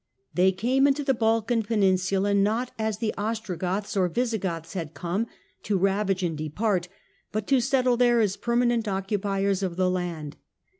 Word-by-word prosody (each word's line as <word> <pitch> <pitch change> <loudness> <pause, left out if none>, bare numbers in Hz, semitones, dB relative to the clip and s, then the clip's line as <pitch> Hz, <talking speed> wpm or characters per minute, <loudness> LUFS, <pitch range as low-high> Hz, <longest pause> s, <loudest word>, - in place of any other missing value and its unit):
They 185 +1 +4
came 255 +8 +2
into 285 +1 +1
the 270 -1 +2
Balkan 225 0 +1
Peninsula, 195 -2 +1
not 215 +5 +1
as 220 -2 -1
the 220 -1 -1
Ostrogoths 205 -3 -2
or 185 -2 +3
Visigoths 190 -7 -2
had 165 -5 -5
come, 180 +9 -2 0.3
to 205 - 0
ravage 195 0 +1
and 165 -3 -1
depart, 175 +5 -1 0.4
but 215 -1 -2
to 270 +1 +3
settle 255 -1 +2
there 240 -1 +4
as 205 -4 +2
per 235 0 -2
manent 240 -2 +2
occupiers 195 0 -1
of 185 -3 -2
the 185 0 +2
land. 170 -5 -4
200 Hz, 160 wpm, -26 LUFS, 185-230 Hz, 0.4 s, They